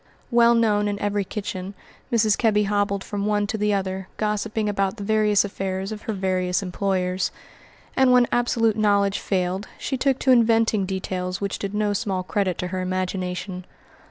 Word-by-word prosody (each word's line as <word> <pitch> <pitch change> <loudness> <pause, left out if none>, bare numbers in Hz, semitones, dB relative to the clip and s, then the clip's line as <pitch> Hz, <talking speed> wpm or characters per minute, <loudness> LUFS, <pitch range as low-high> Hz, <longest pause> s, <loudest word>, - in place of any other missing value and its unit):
Well 235 0 +5
known 210 -3 +2
in 205 0 -1
every 205 0 -1
kitchen, 195 -1 -5 0.4
Mrs. 220 -3 +3
Kebby 210 -3 +2
hobbled 200 -1 0
from 205 0 -3
one 210 -1 +1
to 210 - -3
the 210 0 +1
other, 190 -1 -2
gossiping 210 0 -1
about 195 0 0
the 205 - -6
various 210 -1 +3
affairs 195 0 -3
of 215 -1 -6
her 220 - -3
various 185 -1 0
employers; 185 -1 -1 0.7
and 265 -1 +4
when 250 -1 +6
absolute 230 -2 +2
knowledge 200 -2 +2
failed 185 +1 -1
she 265 - -3
took 265 0 +1
to 260 - +2
inventing 225 -4 +3
details 185 -1 -3
which 200 -1 -3
did 200 0 -4
no 210 -1 +1
small 190 -2 -2
credit 185 -2 -1
to 180 - -3
her 185 0 -3
imagination. 185 0 -3
200 Hz, 170 wpm, -23 LUFS, 190-215 Hz, 0.7 s, when